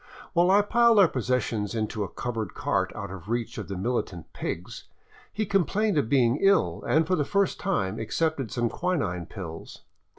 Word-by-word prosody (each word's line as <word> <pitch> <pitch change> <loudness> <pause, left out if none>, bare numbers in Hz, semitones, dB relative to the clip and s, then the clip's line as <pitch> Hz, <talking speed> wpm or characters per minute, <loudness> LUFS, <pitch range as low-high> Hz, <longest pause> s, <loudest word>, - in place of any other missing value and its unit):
While 175 +1 +4
I 200 +2 +5
piled 235 +1 +4
our 195 -3 +8
possessions 115 -5 -1
into 110 -1 -2
a 95 - -5
covered 110 -3 -4
cart - - 0
out 100 -1 -6
of 95 +1 -9
reach 120 0 -2
of - - -6
the 95 - -5
militant 95 -5 -3
pigs, 90 +2 -5 0.5
he 215 +1 -2
complained 200 +2 +1
of 140 -7 +1
being 125 -1 +3
ill 195 0 +3
and 160 +1 +3
for 185 - +1
the 150 - +1
first 200 +6 0
time 110 - -1
accepted 135 +3 -1
some 120 -1 0
quinine 110 - -2
pills. 85 -6 -8
125 Hz, 175 wpm, -27 LUFS, -, 0.5 s, our